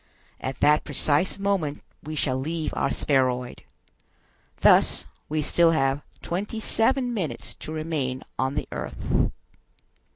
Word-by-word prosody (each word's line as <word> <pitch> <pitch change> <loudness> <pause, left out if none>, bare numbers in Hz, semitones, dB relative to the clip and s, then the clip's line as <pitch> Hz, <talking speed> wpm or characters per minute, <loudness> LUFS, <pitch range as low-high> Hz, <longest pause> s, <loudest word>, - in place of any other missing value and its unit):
At 130 0 -5
that 150 +1 +5
precise 150 +5 +1
moment 195 -7 -1 0.2
we 155 +1 -6
shall 130 -3 +1
leave 160 +3 -2
our - - +1
spheroid. 125 -3 0 1.0
Thus - - +5 0.2
we 155 0 0
still 165 +2 +4
have 135 -1 +1 0.2
twenty 205 +6 -3
seven 245 +3 +1
minutes 185 -9 -4
to - - -6
remain 155 -5 -2 0.2
on 130 +1 0
the - - -2
earth." - - -1
155 Hz, 125 wpm, -26 LUFS, 135-175 Hz, 1.0 s, that